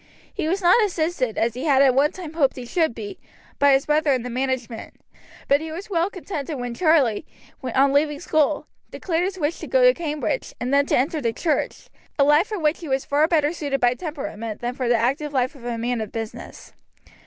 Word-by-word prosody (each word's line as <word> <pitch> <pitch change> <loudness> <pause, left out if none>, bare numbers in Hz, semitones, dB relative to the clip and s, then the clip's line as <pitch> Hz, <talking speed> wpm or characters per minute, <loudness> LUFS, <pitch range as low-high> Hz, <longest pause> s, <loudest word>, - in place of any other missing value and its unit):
He - - -2
was 380 +4 -1
not 365 +6 +6
assisted, 320 - -1
as 230 0 +1
he 250 +5 -5
had 275 -3 +5
at 265 -2 +5
one 280 +3 +3
time 345 -5 -8
hoped 285 -5 +2
he 250 - -7
should 320 -1 0
be, 210 -3 -7 0.4
by 285 0 +5
his 270 0 +2
brother 300 0 +2
in 255 -3 -1
the 250 - -5
management; 255 -2 -3 0.5
but 280 +2 +3
he 320 0 -6
was 370 +6 -8
well 340 +1 +1
contented 320 -6 -5
when 245 -1 -4
Charlie, 295 - +2 0.4
on 270 +2 +2
leaving 295 0 +2
school, 300 -1 +1 0.2
declared 345 -1 -1
his 380 0 -4
wish 320 -1 -1
to - - -7
go - - +3
to - - +7
Cambridge, 320 +7 -3
and 250 +3 -2
then 280 0 +3
to - - +2
enter 295 +4 0
the 230 -3 0
church, 315 +5 -2 0.3
a 280 - +5
life 295 +7 +4
for 425 - -4
which 310 -2 +1
he 335 - -8
was 265 0 0
far 295 +2 +2
better 315 -2 +2
suited 285 -5 -2
by 245 -1 +3
temperament 250 - -6
than 240 +1 -3
for 250 -1 -2
the 240 - +4
active 275 +6 -1
life 255 -1 +1
of 260 -5 -14
a 240 -1 -3
man 240 0 -1
of 215 - -5
business. 225 -1 -7
285 Hz, 220 wpm, -23 LUFS, 250-320 Hz, 0.5 s, to